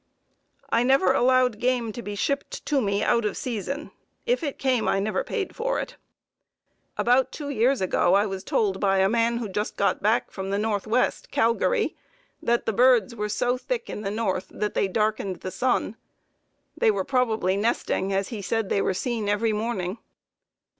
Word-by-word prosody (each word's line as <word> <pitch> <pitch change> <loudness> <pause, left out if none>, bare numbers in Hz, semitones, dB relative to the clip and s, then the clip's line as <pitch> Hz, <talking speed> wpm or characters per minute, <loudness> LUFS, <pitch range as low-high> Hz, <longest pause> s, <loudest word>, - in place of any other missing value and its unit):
I 230 - +3
never 245 -7 +4
allowed 250 -3 +3
game 245 -3 0
to 240 - -7
be 205 -2 -6
shipped 280 - -2
to 285 -3 +1
me 200 -1 0
out 235 - +2
of 210 - -2
season; 270 +3 -4 0.3
if - - +1
it 290 -4 -3
came, 255 -4 +1
I 195 - +2
never 215 - -1
paid 435 -6 -4
for - - -1
it. - - -6 1.0
About 250 +2 +3
two 290 -2 -6
years 255 +1 +2
ago 185 0 +3
I 200 +1 +4
was 195 -2 -5
told 195 -3 0
by 195 -1 +2
a 190 0 +4
man 230 +2 +1
who 235 -2 -3
just 205 +2 -3
got 200 - +1
back 220 +4 +1
from 190 -1 -5
the 200 - 0
Northwest, 215 +3 0
Calgary, 335 - +1 0.5
that 235 0 +1
the 225 - 0
birds 250 +1 +4
were 210 -1 -3
so 245 +4 0
thick 485 - -3
in - - -5
the 195 - -3
north 200 -3 -1
that 210 0 -3
they - - +1
darkened 210 -2 -1
the 185 - -5
sun. 245 -3 0 0.8
They 470 - +3
were 420 - 0
probably 230 -8 +1
nesting, 200 -2 0
as 195 0 0
he 225 -4 -5
said 220 +1 -1
they 200 - +1
were 190 - 0
seen 220 0 -2
every 215 +2 +1
morning.... 210 -2 -2
225 Hz, 185 wpm, -25 LUFS, 200-255 Hz, 1.0 s, never